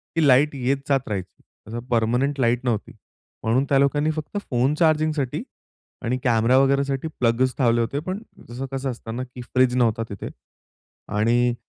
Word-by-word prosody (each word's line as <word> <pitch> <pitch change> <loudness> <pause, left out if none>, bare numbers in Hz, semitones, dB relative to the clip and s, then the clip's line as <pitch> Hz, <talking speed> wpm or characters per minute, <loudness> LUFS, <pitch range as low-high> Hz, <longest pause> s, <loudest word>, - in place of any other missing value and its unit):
की 160 -3 +3
लाईट 140 +3 +4
येत 135 +1 0
जात 135 -1 +1
राहायची. 95 -3 -5 0.3
जसं 115 +2 -5
परमनेंट 125 +5 +1
लाईट 125 0 +1
नव्हती. 115 -4 -1 0.5
म्हणून 115 +5 +2
त्या 140 - +4
लोकांनी 145 +2 +2
फक्त 155 +5 -5
फोन 125 +2 +2
चार्जिंगसाठी 155 -4 +1 0.6
आणि 125 +2 0
कॅमेरा 115 +1 +3
वगैरेसाठी 140 +1 +2
प्लग्स 125 +2 +2
लावले 120 -2 +3
होते. 120 +5 -1
पण 185 +6 -4 0.3
तसं 125 +3 -5
कसं 135 0 -2
असतं 115 -1 -7
ना? 125 - -3
की 125 0 -10
फ्रिज 125 0 +2
नव्हता 115 -2 +2
तिथे. 100 - -6 0.9
आणि 120 +3 +3
130 Hz, 160 wpm, -23 LUFS, 120-140 Hz, 0.9 s, लाईट